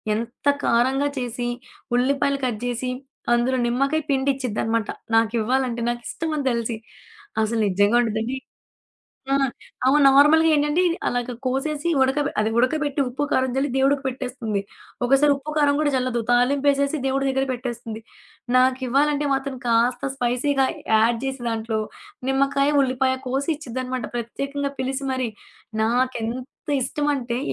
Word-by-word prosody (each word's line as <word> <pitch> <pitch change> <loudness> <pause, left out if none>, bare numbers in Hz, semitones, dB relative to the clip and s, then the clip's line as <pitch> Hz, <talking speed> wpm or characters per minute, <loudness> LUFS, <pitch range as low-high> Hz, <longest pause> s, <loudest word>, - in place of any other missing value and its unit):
ఎంత 235 +5 -5 0.2
కారంగా 265 +4 +2
చేసి, 245 -1 -3 0.5
ఉల్లిపాయలు 275 +2 +1
కట్ 230 -3 -2
జేసి, 245 +1 -2 0.4
అందులో 250 +2 +2
నిమ్మకాయ 275 +6 +1
పిండిచ్చిద్దనమాట. 255 -5 0 0.3
నాకివ్వాలంటే 235 +2 +1
నాకిష్టమని 285 +5 -3
తెలిసి. 235 -1 -2 0.7
అసలు 225 +1 -1
నిజ్జంగా 205 +4 +3
ఉండదండి 225 +3 -2 1.0
ఆ! - - +5 0.5
అమ 275 +3 +5
నార్మల్‌గా 300 +4 +6
ఏంటంటే, 295 +4 +2 0.3
అలాగా 245 0 -2
కోసేసి 290 +5 -1
ఉడక 265 +2 +2 0.2
అదే 215 +1 +1
ఉడకబెట్టి 290 +3 +1
ఉప్పు, 265 +4 -4
కారం 260 0 +2
జల్లి 270 0 +1
దేవుడికి 270 +1 +2
పెట్టేస్తుంది. 250 -5 -3 0.4
ఒకోసారి 275 +3 +4
ఉప్పు 275 +2 -7
కారం 285 -1 +4
గూడా 300 -1 +2
జల్లదు. 250 -2 0
తాలింపేసేసి 280 +4 +2
దేవుడి 270 +1 0
దగ్గర 270 0 +1
పెట్టేస్తుంది. 235 -3 -5 0.6
నాకివ్వాలంటే 260 +3 +2
మాత్రం 270 0 -3
కాస్త 245 +3 +2
స్పైసీగా 265 +2 +1 0.3
యాడ్ 230 +2 +4
చేసి 270 -1 -3
దాంట్లో, 225 -1 -2 0.5
నిమ్మకాయ, 275 +1 +2
ఉల్లిపాయ 260 0 +1
కోసి 270 +5 -1
ఇచ్చిద్దనమాట. 255 -3 -4
ప్రత్యేకంగా 275 +4 -3
పిలిసి 265 +1 -2
మరీ. 255 -2 -1 0.5
నాకెంత 245 +3 -2
ఇష్టం 295 +3 -1
అంటే 240 -2 -3
260 Hz, 120 wpm, -23 LUFS, 240-275 Hz, 1.0 s, నార్మల్‌గా